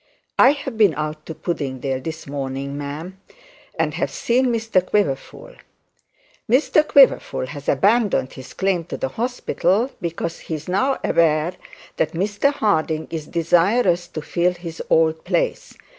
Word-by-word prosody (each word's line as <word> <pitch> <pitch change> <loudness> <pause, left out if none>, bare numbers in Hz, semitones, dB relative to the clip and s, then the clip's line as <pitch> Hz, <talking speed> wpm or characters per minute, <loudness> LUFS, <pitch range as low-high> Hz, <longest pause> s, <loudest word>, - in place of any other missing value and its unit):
'I 260 - +8
have 265 -5 -7
been 200 -8 +5
out 155 +1 -5
to 160 - -6
Puddingdale 135 -6 -3
this 160 0 -6
morning, 140 0 -4
ma'am, 155 +7 -6 0.6
and - - 0
have - - -1
seen 255 +2 +1
Mr 225 -5 +1
Quiverful. 180 -9 -2 1.0
Mr 270 +5 +4
Quiverful 270 - +4
has 140 +2 -6
abandoned 200 - +2
his 130 -1 -11
claim 190 -3 0
to - - -6
the 265 - -2
hospital, 240 -1 0
because 170 -1 -4
he 160 - -5
is 155 0 -8
now 200 +10 +1
aware 160 +1 +2 0.4
that - - 0
Mr 205 +10 +1
Harding 160 - 0
is 155 -2 -5
desirous 175 +2 +2
to 155 - -7
fill 175 +3 +1
his 170 -2 -7
old 160 0 +3
place. - - -1
170 Hz, 145 wpm, -21 LUFS, 155-215 Hz, 1.0 s, I